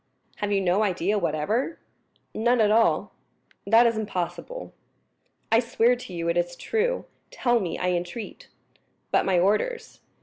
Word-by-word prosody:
"Have 205 -1 -2
you 200 -1 +2
no 185 +2 +2
idea 200 0 +1
whatever?" 215 - -1 0.6
"None 240 +2 +2
at 210 -1 +4
all." 225 +1 +2 0.5
"That 225 +3 +6
is 230 -2 +2
impossible." 215 - -5 0.8
"I 225 - +6
swear 235 0 +2
to 245 -5 -10
you 170 -1 -3
it 170 +1 +1
is 175 0 -1
true. 465 - -1 0.2
Tell 240 -2 +1
me, 185 -5 -3
I 180 - -1
entreat." 175 +6 -5 0.6
"But - - +3
my 190 -2 +2
orders." 215 - 0
215 Hz, 145 wpm, -25 LUFS, 180-240 Hz, 0.8 s, That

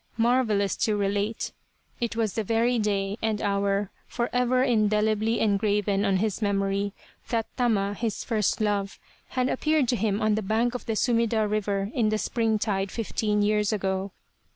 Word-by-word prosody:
Marvellous 225 -4 +2
to 215 - +1
relate 205 +2 -1 0.5
it 235 -1 -2
was 220 -4 0
the 220 - -1
very 230 +3 +1
day 200 0 -1
and 220 -2 0
hour, 200 -1 0 0.2
for 240 0 -2
ever 250 +1 +2
indelibly 215 -2 +2
engraven 205 -1 +1
on 195 -1 +2
his 215 +2 -1
memory, 200 0 0 0.4
that 225 -2 0
Tama, 210 -5 +1
his 220 0 -3
first 215 -5 0
love, 205 -2 -1 0.3
had 255 -1 0
appeared 305 0 +1
to 245 - +3
him 215 -3 0
on 215 -1 +2
the 215 - 0
bank 220 +4 0
of 250 - -6
the 225 - 0
Sumida 230 -2 +2
river 205 -1 -1
in 225 -4 +2
the 215 - +1
springtide 215 -4 0
fifteen 210 -1 -1
years 210 0 +2
ago. 195 -1 -1
215 Hz, 160 wpm, -26 LUFS, 200-230 Hz, 0.5 s, to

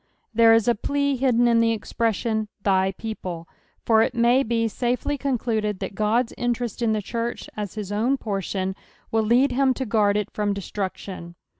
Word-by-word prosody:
There 230 0 +6
is 225 -1 +4
a 240 - +5
plea 280 +5 0
hidden 245 -2 +3
in 230 -1 +4
tbo 230 0 +2
expression, 220 0 -1
" - - -41
thy 190 -1 +2
people:" 180 -6 -6 0.4
for 220 -1 +5
it 245 - 0
ma^ 240 +3 +4
be 230 0 +1
safel;^ 250 +5 -1
concluded 225 -6 -1
that 190 +1 -5
Ood's 230 +3 +1
interest 240 -2 -2
in 225 -2 +2
the 215 -1 -1
church, 235 +3 -4
as 210 -1 -5
his 205 -2 -5
own 235 +7 +1
portion, 195 -3 -3 0.4
will 225 - +2
lead 245 +5 +3
him 260 0 +2
to 265 - -3
guard 210 -2 +2
it 210 - -2
from 205 -1 -1
destruction. 190 -3 -5
225 Hz, 180 wpm, -24 LUFS, 205-240 Hz, 0.4 s, There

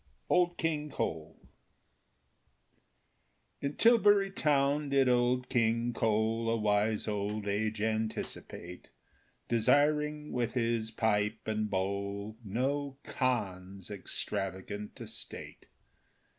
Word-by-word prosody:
Old 175 -1 +3
King 150 -2 -1
Cole 80 - -4 2.1
In 140 +1 -2
Tilbury 205 -4 +5
Town 145 -4 +2
did 135 -1 +4
Old 125 0 +2
King 115 -1 +1
Cole 110 +1 +1
A 115 - +2
wise 105 0 +1
old 105 0 -2
age 110 +2 -1
anticipate, 110 -5 -4 0.6
Desiring, 150 +5 +2
with 120 -1 -1
his 115 -2 +1
pipe 110 -1 0
and 110 -1 -1
bowl, 100 +2 -2
No 135 +6 -1
Khan's 100 -7 -2
extravagant 100 +1 -4
estate. - - -8
115 Hz, 90 wpm, -31 LUFS, 105-140 Hz, 2.1 s, Tilbury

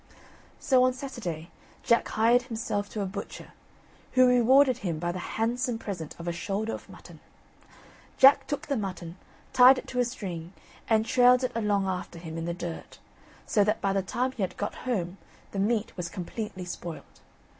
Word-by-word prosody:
So 260 -2 +3
on 255 0 +3
Saturday, 200 - -6 0.3
Jack 235 - +3
hired 230 +3 +3
himself 220 -4 -3
to 215 - -4
a - - -2
butcher, 195 +2 -7 0.6
who 255 0 +6
rewarded 250 +1 +5
him 170 -7 -2
by 175 +2 -2
the 180 - -5
handsome 235 +5 -1
present 180 -8 -6
of 170 - -7
a - - +1
shoulder 200 +5 -3
of - - -8
mutton. - - -13 1.0
Jack 270 +1 +7
took 290 +1 -3
the 285 - -1
mutton, 180 -5 -5 0.4
tied 255 +1 +8
it - - -6
to 250 - -2
a - - +5
string, 180 -7 -6 0.4
and 220 -1 +3
trailed 250 +2 +5
it 255 - 0
along 210 -3 +1
after 180 -2 -4
him 165 -1 -8
in 165 0 -4
the 170 - -2
dirt, 175 -2 -7 0.5
so 205 - +3
that 210 +1 +1
by 195 -1 0
the 195 - +1
time 250 +7 -1
he 250 - -7
had 190 - -2
got 205 - -3 0.2
home 190 -5 -2 0.3
the 195 - -4
meat 215 +2 0
was 175 -2 -4
completely 190 +1 -6
spoilt. 175 -1 -8
210 Hz, 180 wpm, -28 LUFS, 180-245 Hz, 1.0 s, tied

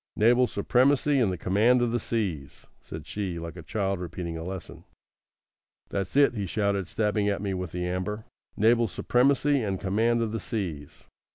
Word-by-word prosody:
"Naval 120 +3 +4
supremacy 135 +7 +2
and 110 -6 +2
the 90 - -3
command 105 +9 +3
of 120 - 0
the 120 - 0
seas," 90 - -3 0.2
said 80 -1 -9
she, 95 -1 -4
like 85 -1 -6
a 85 - -8
child 95 +3 -2
repeating 85 -1 -5
a 80 - -5
lesson. 95 +1 -7 1.1
"That's 100 +2 -3
it," 140 -2 +5
he 100 -4 -3
shouted, 100 +1 0
stabbing 105 -1 0
at 100 - -1
me 100 -1 -2
with 90 -2 -4
the 90 0 -3
amber. 95 +4 -3 0.3
"Naval 115 +2 +4
supremacy 135 - +2
and 100 -4 -2
command 115 +4 +1
of 110 - -2
the 115 - -3
seas. 85 -10 -5
100 Hz, 175 wpm, -27 LUFS, 90-115 Hz, 1.1 s, it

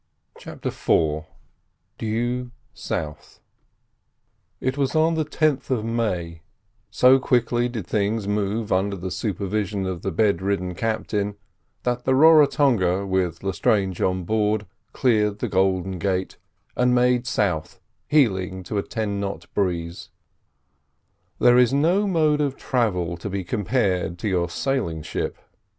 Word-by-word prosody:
CHAPTER - - -6
IV 75 -1 0 0.7
DUE 120 +3 -2 0.2
SOUTH 75 -1 -5 1.2
It 130 +1 -1
was 140 +1 -1
on 160 +1 +3
the 160 -1 0
10th 155 -2 0
of 120 -5 0
May, 90 -8 -2 0.5
so 130 +1 +5
quickly 120 -1 +1
did 115 -6 -5
things 105 +1 -1
move 105 +1 -1
under 100 +2 +1
the 95 0 -5
supervision 100 -1 -2
of 90 -2 -4
the 95 - -2
bedridden 95 -1 0
captain, 105 0 -2 0.5
that 125 0 -1
the 130 - +3
Raratonga, 135 - +4
with 95 -3 -1
Lestrange 95 -1 0
on 95 0 0
board, 105 +2 0 0.3
cleared 105 -5 +1
the - - -2
Golden 95 -1 0
Gates, 95 0 -2 0.4
and 125 0 +3
made 125 0 +2
south, 90 -7 -1 0.3
heeling 95 -10 +1
to 100 +3 -2
a - - +1
ten 105 -3 -3
knot 100 -4 -4
breeze. 85 -3 -2 1.3
There 120 0 +5
is 125 -2 +4
no 175 +8 +2
mode 155 -5 +2
of 140 -2 -1
travel 90 -9 -1
to 95 - -6
be 95 0 -3
compared 95 -3 -1
to 105 - -4
your 90 -3 0
sailing 85 - -2
ship. - - -3
105 Hz, 130 wpm, -23 LUFS, 95-125 Hz, 1.3 s, so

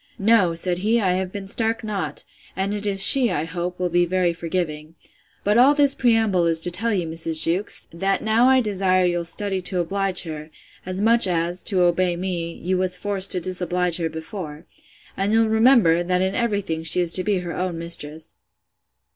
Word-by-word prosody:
No, 200 -5 +2
said 175 +1 +1
he, 220 +5 +1
I 190 -4 +1
have 185 0 -3
been 200 -1 -7
stark 225 +3 0
naught; 195 -8 -4 0.3
and 195 +2 -2
it 210 0 -4
is 195 -1 +5
she, 260 -4 +6
I 150 - -2
hope, 175 +1 -5
will 180 -1 -2
be 175 +1 +2
very 180 -1 0
forgiving. 165 -2 -5 0.5
But 210 +3 +2
all 275 +4 +5
this 285 -2 +4
preamble 225 -9 +1
is 165 -1 +4
to 175 - +4
tell 225 +6 -1
you, 185 -5 -1
Mrs. 160 0 -1
Jewkes, 180 +5 -2
that 195 +3 -1
now 225 +3 +3
I 260 0 +4
desire 190 -4 +1
you'll 175 -1 -1
study 195 +1 -2
to 180 0 0
oblige 195 +2 -1
her, 155 -2 -8 0.4
as 185 +1 -4
much 230 -1 +4
as 175 0 -1
(to 190 -4 -1
obey 175 0 +1
me) 175 -2 -4
you 180 +2 -3
was 185 -1 -1
forced 200 0 -1
to 185 - -1
disoblige 180 -1 -1
her 165 -2 -2
before. 160 -1 -8 0.5
And 195 +2 -1
you'll 225 0 +3
remember, 220 -7 +4
that 180 +1 -1
in 190 +1 -1
every 220 -4 -1
thing 160 -4 -5
she 165 +2 +3
is 175 -2 +1
to 185 - +2
be 205 -1 0
her 175 -2 -6
own 180 -2 -3
mistress. 160 -2 -3
185 Hz, 200 wpm, -21 LUFS, 170-205 Hz, 0.5 s, she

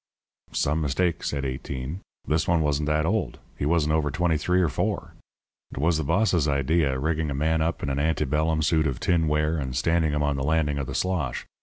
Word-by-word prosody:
"Some 75 +3 0
mistake," 80 +4 0
said 70 -1 -2
Eighteen. 65 +4 -4 0.3
"This 80 +1 +1
one 85 -2 +3
wasn't 75 0 0
that 75 0 +1
old. 110 +6 -1 0.2
He 70 - 0
wasn't 75 -2 +2
over 80 -2 +1
twenty 85 +2 +1
three 90 +4 +1
or 90 - +3
four. 70 - -2 0.6
"It - - -10
was 80 +4 +2
the 80 - -1
boss's 90 -1 +2
idea, 70 0 +1
rigging 80 +2 -1
a 70 - -2
man 80 +3 +1
up 85 +2 -1
in - - -1
an 70 - -1
ante 75 0 +1
bellum 80 +3 +1
suit 80 0 +2
of 65 -3 -3
tinware 80 -2 +1
and 65 -3 -3
standing 80 +3 +2
him 75 0 0
on 75 -1 0
the 65 - -2
landing 75 -1 +1
of 70 - -3
the - - -5
slosh. 90 -4 -1
75 Hz, 210 wpm, -25 LUFS, 70-80 Hz, 0.6 s, one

